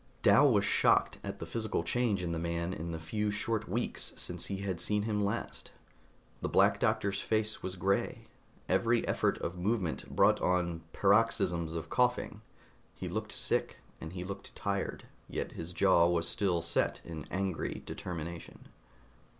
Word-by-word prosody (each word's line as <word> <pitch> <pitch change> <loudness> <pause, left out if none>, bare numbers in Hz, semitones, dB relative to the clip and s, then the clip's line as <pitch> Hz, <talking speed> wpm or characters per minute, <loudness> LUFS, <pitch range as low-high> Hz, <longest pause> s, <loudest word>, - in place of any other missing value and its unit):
Dal 145 -1 +7
was 100 -3 +3
shocked - - +3
at - - -5
the - - -6
physical 110 -7 -2
change 105 0 +1
in 85 - -2
the 85 - -1
man 85 +1 -2
in 85 +1 -5
the 80 - -3
few 105 +7 -2
short 105 0 -1
weeks 120 +6 -1
since - - -3
he 95 0 -4
had 95 -3 -2
seen 105 -1 +1
him 105 -1 0
last. 100 +4 -3 0.7
The - - -1
Black - - +4
Doctor's 100 0 +1
face 110 -1 0
was 95 0 -4
gray; 95 +2 0 0.4
every 115 +5 +2
effort - - +1
of 90 +1 -3
movement 95 -3 -1
brought - - +5
on 85 -2 +1
paroxysms 95 -6 +2
of 80 -1 -5
coughing. 125 0 +1 0.5
He - - -5
looked - - -3
sick, - - 0 0.2
and 80 +2 -7
he 90 -1 -4
looked 95 +1 -8
tired, - - -2 0.3
yet - - -3
his 85 +2 -6
jaw 90 -2 +5
was 85 -1 +1
still 85 -1 0
set 85 0 0
in 80 -3 -6
angry 95 -2 -2
determination. 85 -2 -7
95 Hz, 160 wpm, -32 LUFS, 85-105 Hz, 0.7 s, Dal